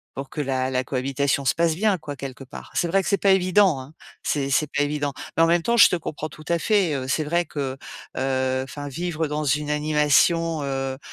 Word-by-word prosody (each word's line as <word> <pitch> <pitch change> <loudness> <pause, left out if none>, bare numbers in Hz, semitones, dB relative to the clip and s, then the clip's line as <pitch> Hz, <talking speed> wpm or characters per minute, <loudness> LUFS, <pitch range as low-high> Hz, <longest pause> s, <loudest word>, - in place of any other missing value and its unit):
pour 135 0 -6
que 150 - -4
la 130 -2 -1
la 130 0 0
cohabitation 135 +2 -1
se 130 - +2
passe 165 -1 +2
bien, 200 +3 +1
quoi, 150 -3 -7
quelque 135 -1 -8
part. 135 +2 -11
C'est 175 - +1
vrai 195 +3 +2
que 175 - -3
c'est 200 - +3
pas 195 +1 +3
évident, 185 -3 +4
hein. 135 +4 -13 0.3
C'est 140 -2 -1
c'est 150 +3 +2
pas 145 - +1
évident. 145 -1 -1 0.2
Mais - - +2
en 165 - +6
même 170 0 +2
temps, 235 - +1
je 235 - +8
te - - +1
comprends 155 -2 -5
tout 155 +1 -13
à 170 - +2
fait, 195 -5 +2
heu, 130 -2 -3
c'est 155 +4 0
vrai 170 +3 0
que, 135 -3 -4 0.4
heu, 130 0 0
enfin 145 +2 -7
vivre 165 +2 -2
dans 150 0 -2
une 150 +1 0
animation, 150 +2 +2
heu 135 -1 -3
150 Hz, 230 wpm, -23 LUFS, 135-165 Hz, 0.4 s, je